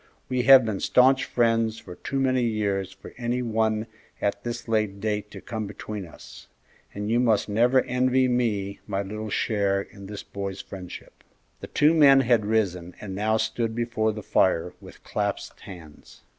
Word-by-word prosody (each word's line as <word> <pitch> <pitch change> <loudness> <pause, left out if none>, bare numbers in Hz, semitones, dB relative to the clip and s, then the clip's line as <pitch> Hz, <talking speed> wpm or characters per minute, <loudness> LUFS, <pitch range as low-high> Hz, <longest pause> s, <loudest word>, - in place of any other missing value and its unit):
We 130 -1 +1
have 135 -2 +9
been 105 -3 -2
stanch 130 +1 +4
friends 115 -2 +1
for 90 - -10
too 135 +9 -4
many 130 -1 +2
years 100 -5 -1
for - - -13
any 120 +1 -1
one 110 -1 0 0.3
at 100 0 -1
this 120 0 -5
late 110 -3 0
date 105 0 -2
to - - -10
come 110 -3 -5
between 105 -1 -7
us; - - -14 0.4
and 105 +2 -4
you 120 - +3
must 115 -4 +2
never 120 +5 +3
envy 130 +1 +2
me 105 -5 -1
my 100 -1 -2
little 105 +2 -6
share 100 -2 0
in 100 0 -9
the 105 0 -7
boy's 100 -1 -4
friendship." 90 -2 -10 0.4
The - - -8
two 150 +2 +3
men 140 -4 +7
had 120 -4 +2
risen 90 -5 -1
and 100 -3 -7
now 110 +3 +1
stood 110 0 -2
before 115 -2 0
the 105 -1 -7
fire 90 -2 +1
with - - -14
clasped - - -3
hands. 80 -6 -13
110 Hz, 170 wpm, -25 LUFS, 100-120 Hz, 0.4 s, have